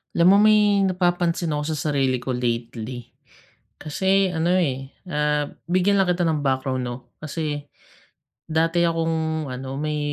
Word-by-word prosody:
Alam 170 +1 +4
mo, - - +7
may 210 -2 +4
napapansin 175 -2 0
ako 150 0 -1
sa 150 +1 -2
sarili 135 -2 +1
ko 130 - -3
lately. 120 0 -3 0.7
Kasi 190 +5 +1
ano, 170 +2 +1
eh, 135 -6 -1 0.2
ah, 150 -1 0 0.2
bigyan 185 +3 +2
lang 190 -2 +2
kita 175 0 +1
ng 155 -2 0
background 130 -1 0
'no? 120 0 -4 0.2
Kasi 155 -1 -3 0.8
dati 165 +2 +1
akong 160 -2 -1
ano, 130 +1 -6
may 150 0 -2
160 Hz, 140 wpm, -23 LUFS, 135-175 Hz, 0.8 s, mo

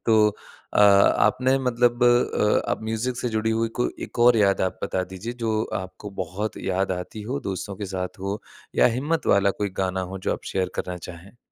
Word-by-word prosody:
तो 115 - +5 0.6
अ, - - +3
आपने 110 +6 +4
मतलब 120 0 +2
अ, 120 -3 +3
आप - - -2
म्यूजिक 120 +3 -2
से 125 - -2
जुड़ी 110 +1 +1
हुई 115 - +1
कोई - - +1 0.2
एक - - -13
और 125 - +7
याद 100 -3 +3
आप - - -15
बता 95 - -1
दीजिए, 110 +6 -5
जो 110 -1 +1 0.2
आपको 95 +2 -9
बहुत 95 +5 -4
याद 95 0 0
आती 90 +4 -6
हो, 140 +1 -1
दोस्तों 95 +1 -4
के - - -2
साथ 90 +2 -4
हो, 100 +2 -2 0.4
या - - +8
हिम्मत 160 +4 -1
वाला 100 0 +3
कोई 100 - +1
गाना 95 0 -1
हो 95 - -5
जो - - +3
आप - - -6
शेयर 95 -1 0
करना 90 -1 -5
चाहें? 90 +6 -11
105 Hz, 200 wpm, -24 LUFS, 95-120 Hz, 0.6 s, या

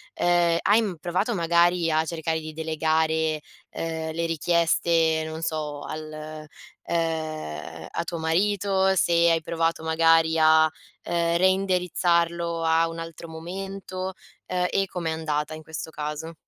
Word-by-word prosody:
ehm, 175 -1 +3
hai 215 +3 +4
m 200 -5 -2
provato 185 +7 -1
magari 170 0 +3
a 155 +1 +3
cercare 160 0 -2
di 155 0 -8
delegare, 160 0 0 0.3
ehm, 160 -1 -4
le 165 +1 -1
richieste, 165 0 +2
non 160 0 -6
so, 150 -2 -3
al, 155 0 -7 0.4
ehm 155 - -3
a 170 - -1
tuo 170 0 -5
marito? 190 +3 +2
Se 175 - +2 0.2
hai 165 - +2
provato 165 0 -1
magari, 165 0 +4
a 160 0 +6 0.4
ehm, 170 0 +1
reindirizzarlo 175 -3 +1
a 165 0 +3
un 165 - -7
altro 165 0 -8
momento? 185 +3 -6 0.3
Ehm, 180 0 0
e 195 0 +1
com'è 170 -3 -3
andata 155 -1 -2
in 155 - -8
questo 160 +1 -6
caso? 150 +2 -5
165 Hz, 135 wpm, -25 LUFS, 160-175 Hz, 0.4 s, a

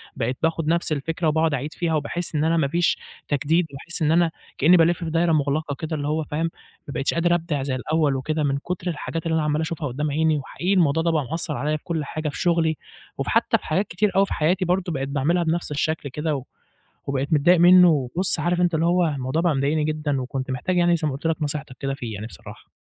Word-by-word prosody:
بقيت 125 0 -2
باخد 165 -1 0
نَفْس 170 +1 +1
الفكرة 160 +4 -2
وباقعد 160 0 +2
أعيد 145 +3 -4
فيها 165 0 -1
وباحس 170 +2 -3
إن 150 - +1
أنا 165 +1 +2
ما 140 - +2
فيش 170 +4 +1 0.3
تجديد، 155 +4 +1
باحس 165 +5 -6
إن 155 -1 +3
أنا 170 0 +3 0.3
كأني 170 +6 +6
بالِف 170 +1 +3
في 165 - -3
دايرة 165 +1 +2
مُغلقة 145 0 0
كده 160 +2 -4
اللي 145 0 -3
هو 155 +1 0
فاهم؟ 155 +3 -2 0.4
ما 140 - -6
بقيتش 135 +3 0
قادر 175 +1 +3
أبدِع 160 -5 -2
زي 135 -1 -2
الأول 150 +2 +1
وكده 155 +4 -1
من 140 -1 +1
كُتر 175 +4 -5
الحاجات 165 0 -4
اللي 160 -1 +1
أنا 160 - +1
عَمّال 150 +1 0
أشوفها 160 -1 -3
قدّام 145 +4 -2
عيني. 155 +1 +2
وحقيقي 175 +7 -2
الموضوع 165 -3 +3
ده 170 - +2
بقى 150 -5 0
مأثّر 160 -2 -2
عليَّ 150 +1 -1
في - - -21
كل 160 -4 -2
حاجة 155 +1 -3
في 145 - -7
شُغلي 165 -2 +2 0.4
وفي - - -2
حتّى - - +3
في - - -16
حاجات 185 +6 0
كتير 200 +4 0
أوي 195 +1 +5
في - - -5
حياتي 180 +5 +1
برضه 180 0 0
بقيت 135 -1 -3
باعملها 150 +6 +1
بنَفْس 165 -1 -1
الشكل 150 0 -1
كده 150 0 -2 0.6
وبقيت 140 +3 -2
متضايق 165 +4 +5
منُّه، 180 0 +8
وبُص 155 +5 0
عارف 175 +2 0
أنت 175 -1 +2
اللي 160 +1 +2
هو 175 0 +3
الموضوع 140 +2 -1
بقى 170 -3 +2
مضايقني 145 +3 +1
جدًا 150 -3 -1
وكنت 130 +1 -4
محتاج 130 +8 -1
يعني 175 -1 +4
زي 155 -2 -1
ما 140 - -3
قُلت 140 +4 -5
لك 165 -1 0
نصيحتك 145 -3 -4
كده 135 0 -2
فيه 120 -5 -6
يعني 105 +2 -6
بصراحة. - - -12
155 Hz, 235 wpm, -23 LUFS, 145-170 Hz, 0.6 s, منُّه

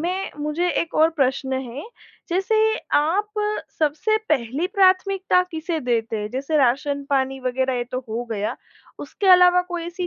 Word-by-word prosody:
मैं 370 +4 -3
मुझे 305 +4 -1
एक 335 - -5
और 320 +1 +4
प्रश्न 265 -3 -1
है 260 +2 -4 0.5
जैसे, 385 +6 0 0.4
आप 375 +8 +1 0.5
सबसे 310 +8 +1
पहली 275 +3 0
प्राथमिकता 375 -1 +3
किसे 320 0 -3
देते 230 -2 -1
हैं 210 0 -4
जैसे 275 +4 -2
राशन-पानी 275 0 0
वग़ैरह 260 +1 -1
ये 240 - -2
तो 255 - -2
हो 235 +2 -3
गया, 210 -1 -2 0.4
उसके 400 - -5
अलावा 360 0 +6
कोई 350 -2 -4
ऐसी 350 +1 -4
300 Hz, 150 wpm, -22 LUFS, 260-360 Hz, 0.5 s, अलावा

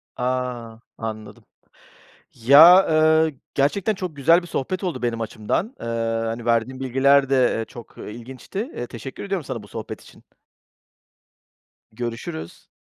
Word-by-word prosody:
A! 125 -3 -3 0.2
Anladım. 110 -2 -7 0.9
Ya, 155 +10 +8
ııı, 160 0 +4 0.2
gerçekten 175 +10 +1
çok 185 -6 -6
güzel 165 +6 +4
bir - - -10
sohbet 180 +4 -3
oldu 155 -9 -3
benim 120 -1 -1
açımdan. 115 - -3
Eee, - - -6 0.4
hani, 115 +1 -4
verdiğin 120 +3 0
bilgiler 135 +2 +3
de, 130 -2 +3
eee, 115 - -2
çok, 120 0 -13
ııı, - - -8
ilginçti. 125 - -9 0.2
Eee, 120 - -5
teşekkür 125 - -8
ediyorum 195 -5 -3
sana 125 -5 -5
bu 100 - -14
sohbet - - -7
için. - - -18 1.7
Görüşürüz. 115 -8 -6
130 Hz, 135 wpm, -22 LUFS, 115-160 Hz, 1.7 s, Ya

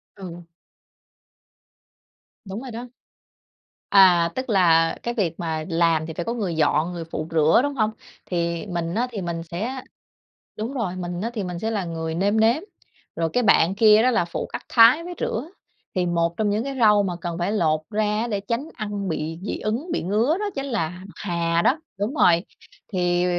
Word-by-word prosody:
Ừ. 175 -3 -8 2.0
Đúng 195 +3 -6
rồi 260 -2 -7
đó. 240 +2 -7 1.0
À, 180 -4 +6
tức 260 0 -4
là, 165 -5 +4
cái 240 - -2
việc 185 -8 -1
mà 160 -2 -3
làm 165 -2 +2
thì 160 - -6
phải 170 +1 -4
có 230 - -1
người 200 -8 -2
dọn, 155 +2 +2
người 170 -1 -5
phụ 155 - -3
rửa, 160 +2 +4
đúng 285 0 -1
hông? 215 -3 +1 0.3
Thì 170 -1 -2
mình 170 -2 -3
á, 240 +3 +1
thì 210 -4 -4
mình 170 -2 -4
sẽ 220 +11 -4 0.8
đúng 225 +6 -4
rồi, 205 -9 -2
mình 175 -1 -4
á, 225 +4 -2
thì 210 -4 -2
mình 180 -1 -5
sẽ 220 +5 -2
là 205 -4 -1
người 160 -1 -4
nêm 200 +5 +1
nếm. 235 +9 +3 0.5
Rồi 165 -1 0
cái 245 - +2
bạn 190 -4 +4
kia 215 +1 +6
đó 255 - +4
là 230 -7 +2
phụ 170 - -4
cắt - - -5
thái 245 +8 +6
với 355 0 -6
rửa. 245 +8 -2 0.5
Thì 180 -1 +1
một 170 0 0
trong 215 -2 +1
những 215 +3 0
cái 275 0 -4
rau 210 -2 +6
mà 185 -3 -2
cần 170 0 -4
phải 175 +4 -1
lột 155 -7 +2
ra 215 0 0 0.2
á, 235 - -1
để 205 -2 -1
tránh 235 +8 -3
ăn 205 -3 -4
bị 160 0 -3
dị 200 - -3
ứng, 230 +10 -3
bị - - -1
ngứa 220 - +1
đó 420 - -2
chính 275 0 -3
là 230 - -1 0.2
bạc 195 - -14
hà 170 -2 0
đó, 275 - +3 0.2
đúng 210 +7 -2
rồi. 175 - +4 0.5
Thì 175 -1 +1
195 Hz, 200 wpm, -23 LUFS, 170-225 Hz, 2.0 s, À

